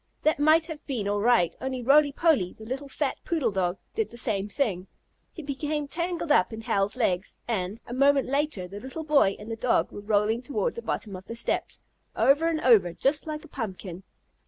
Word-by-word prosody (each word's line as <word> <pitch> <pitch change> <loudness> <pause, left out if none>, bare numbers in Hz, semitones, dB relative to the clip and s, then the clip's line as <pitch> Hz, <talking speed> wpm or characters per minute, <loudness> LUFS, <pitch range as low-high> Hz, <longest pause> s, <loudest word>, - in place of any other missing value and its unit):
That 310 -1 +2
might 310 +2 +5
have 315 -2 -7
been 235 -8 -2
all 205 0 0
right, 225 -7 +3
only 260 -1 -3
Roly 285 +3 +5
Poly, 280 - +2
the 220 - -12
little 270 +4 -5
fat 280 0 -2
poodle 300 -10 0
dog, 185 -1 -1 0.2
did 445 -1 -1
the 235 - -10
same 205 -3 0
thing. 195 -8 -1 0.4
He 325 - -9
became 295 +1 -3
tangled 340 +1 -2
up 185 -11 +4
in 220 0 -6
Hal's 200 +1 0
legs, 190 -6 -1
and, 205 -2 -2
a 240 - -7
moment 275 +1 +3
later, 275 -9 -1
the 200 +3 -8
little 265 +7 -6
boy 285 -10 +3
and 215 +2 -9
the - - -2
dog 235 +2 +1
were 205 - -8
rolling 210 +2 +1
toward 295 - -2
the 470 - -6
bottom 210 - -4
of 185 +1 -10
the 230 - -6
steps, 235 - -2 0.3
over 290 +4 +4
and 320 -2 0
over 210 -9 +5
just 290 - 0
like 305 0 -5
a - - -13
pumpkin. 190 - -6
255 Hz, 205 wpm, -27 LUFS, 205-295 Hz, 0.4 s, might